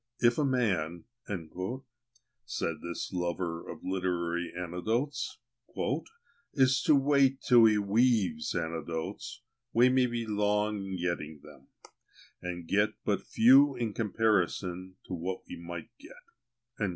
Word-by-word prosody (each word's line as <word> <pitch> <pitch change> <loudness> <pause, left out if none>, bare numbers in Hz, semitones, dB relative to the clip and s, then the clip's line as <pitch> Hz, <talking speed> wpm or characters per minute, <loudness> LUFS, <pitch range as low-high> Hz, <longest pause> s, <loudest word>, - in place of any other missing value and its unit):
"If 120 +2 +3
a - - +3
man," 95 - 0 1.4
said 85 -8 -3
this 85 +2 -5
lover 85 -1 -3
of - - -8
literary 90 -2 -1
anecdotes, 110 - -2 1.2
"is 130 -1 +4
to 150 - +6
wait 135 -1 +3
till 120 -2 +7
he 110 -1 +5
weaves 100 -6 +2
anecdotes, 80 -1 -4 0.3
we 120 +2 +6
may 130 0 +3
be 120 -1 -3
long 105 0 +1
in 95 -1 -4
getting 80 -4 -3
them, 65 - -15 0.7
and 90 -1 -5
get 105 +3 +2
but - - +1
few 135 +4 +5
in 115 -4 -2
comparison 95 -4 0
to - - -7
what 90 +2 -3
we - - -7
might 85 0 -8
get." 285 - -19
105 Hz, 120 wpm, -30 LUFS, 85-120 Hz, 1.4 s, till